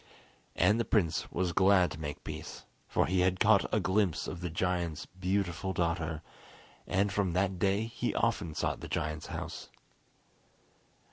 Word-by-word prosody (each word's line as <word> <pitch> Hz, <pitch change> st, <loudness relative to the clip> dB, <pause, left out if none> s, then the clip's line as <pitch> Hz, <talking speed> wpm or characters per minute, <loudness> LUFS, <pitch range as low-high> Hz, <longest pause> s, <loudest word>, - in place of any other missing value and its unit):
And 105 Hz, +6 st, +4 dB
the -, -, +2 dB
prince 95 Hz, -8 st, +1 dB
was 90 Hz, -1 st, -1 dB
glad 95 Hz, 0 st, +5 dB
to 75 Hz, -, -7 dB
make 75 Hz, -2 st, -5 dB
peace, -, -, -7 dB, 0.2 s
for -, -, +2 dB
he 95 Hz, +1 st, +1 dB
had 90 Hz, 0 st, +2 dB
caught 105 Hz, -2 st, +4 dB
a 110 Hz, -, +3 dB
glimpse 95 Hz, -3 st, +1 dB
of 90 Hz, -2 st, -6 dB
the 90 Hz, -, -2 dB
giant's 85 Hz, -2 st, -1 dB
beautiful 95 Hz, 0 st, -2 dB
daughter, 85 Hz, -2 st, -1 dB, 0.6 s
and 100 Hz, +2 st, +1 dB
from 95 Hz, -3 st, +1 dB
that 95 Hz, 0 st, 0 dB
day 100 Hz, +3 st, +2 dB
he 115 Hz, -, -3 dB
often 80 Hz, -2 st, 0 dB
sought -, -, -1 dB
the -, -, -7 dB
giant's 75 Hz, 0 st, -3 dB
house. -, -, -6 dB
90 Hz, 155 wpm, -31 LUFS, 85-100 Hz, 0.6 s, glad